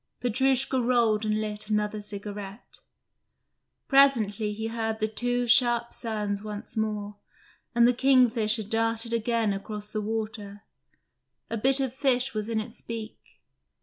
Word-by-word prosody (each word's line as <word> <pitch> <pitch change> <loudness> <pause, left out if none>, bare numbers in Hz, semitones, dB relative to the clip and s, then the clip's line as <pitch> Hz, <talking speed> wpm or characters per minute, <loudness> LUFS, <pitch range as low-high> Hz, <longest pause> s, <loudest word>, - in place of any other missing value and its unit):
Petrushka 265 +2 +1
rolled 230 -3 +2
and 215 0 +1
lit 210 0 -5
another 210 0 -1
cigarette. 205 0 -8 1.1
Presently 225 -7 +3
he 220 +2 -5
heard 225 -1 -3
the 215 - +1
two 245 +2 -1
sharp 235 0 +4
sounds 210 -3 -2
once 210 +2 -7
more, 210 -2 -3 0.6
and 235 0 +6
the 245 - +4
kingfisher 240 -4 +3
darted 225 +2 0
again 230 -2 +1
across 210 +1 -6
the 215 0 -4
water: 215 -1 -5 0.9
a 230 - -1
bit 270 +4 +4
of 265 -3 -1
fish 265 -1 +1
was 215 0 -3
in 225 -1 0
its 220 +1 -8
beak. 225 -1 -7
220 Hz, 135 wpm, -27 LUFS, 210-240 Hz, 1.1 s, and